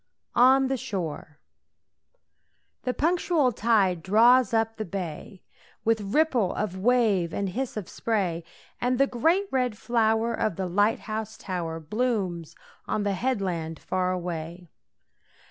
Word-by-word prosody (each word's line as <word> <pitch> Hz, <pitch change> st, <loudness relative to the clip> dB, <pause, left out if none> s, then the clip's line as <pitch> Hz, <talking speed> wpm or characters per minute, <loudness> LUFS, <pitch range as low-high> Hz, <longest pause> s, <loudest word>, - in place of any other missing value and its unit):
ON 260 Hz, +2 st, +5 dB
THE 265 Hz, 0 st, -1 dB
SHORE. 180 Hz, -, -5 dB, 1.5 s
The 250 Hz, -, 0 dB
punctual 330 Hz, -4 st, +2 dB
tide 205 Hz, -6 st, +2 dB
draws 235 Hz, +7 st, +5 dB
up 225 Hz, 0 st, 0 dB
the 215 Hz, -, -2 dB
bay, 185 Hz, 0 st, -6 dB, 0.4 s
With 225 Hz, -1 st, +2 dB
ripple 260 Hz, -, +2 dB
of 205 Hz, -4 st, -2 dB
wave 205 Hz, -5 st, +2 dB
and 200 Hz, -1 st, -1 dB
hiss 245 Hz, +4 st, -4 dB
of 200 Hz, -5 st, -4 dB
spray, 185 Hz, -7 st, -1 dB, 0.4 s
And 250 Hz, +1 st, +1 dB
the 275 Hz, -, +5 dB
great 325 Hz, +11 st, +1 dB
red 250 Hz, -5 st, 0 dB
flower 225 Hz, 0 st, +1 dB
of 215 Hz, -5 st, -1 dB
the 190 Hz, -, -3 dB
light 205 Hz, +5 st, +1 dB
house 220 Hz, 0 st, -5 dB
tower 170 Hz, -5 st, -4 dB
Blooms 185 Hz, -3 st, -2 dB, 0.3 s
on 210 Hz, -, -1 dB
the 200 Hz, -1 st, 0 dB
headland 185 Hz, -8 st, -2 dB
far 185 Hz, 0 st, -1 dB
away. 175 Hz, -1 st, -5 dB
215 Hz, 130 wpm, -26 LUFS, 180-245 Hz, 1.5 s, ON